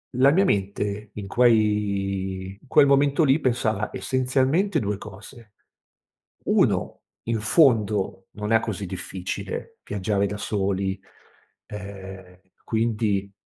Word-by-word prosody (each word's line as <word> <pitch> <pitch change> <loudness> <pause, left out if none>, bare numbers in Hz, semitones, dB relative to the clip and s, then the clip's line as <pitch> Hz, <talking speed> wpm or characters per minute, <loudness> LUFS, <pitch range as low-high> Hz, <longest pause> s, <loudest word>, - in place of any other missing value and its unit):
la 130 +2 +5
mia 190 +6 +3
mente 100 - -1
in 105 -2 -6
quei 100 -4 +1
in - - -21
quel 150 +1 +6
momento 140 +3 +3
lì 135 +2 +4
pensava 110 -5 0
essenzialmente 135 +8 +1
2 105 -4 -2
cose: 105 +3 -12 0.9
1 - - +1 0.3
in 115 -1 0
fondo 110 - +2
non 105 +1 -5
è 115 - +6
così 105 -3 -4
difficile 95 0 -6
viaggiare 100 0 0
da 105 - -4
soli 95 -2 -1 0.7
e 95 -2 -9 0.2
quindi, 110 -3 0
105 Hz, 110 wpm, -24 LUFS, 100-125 Hz, 0.9 s, quel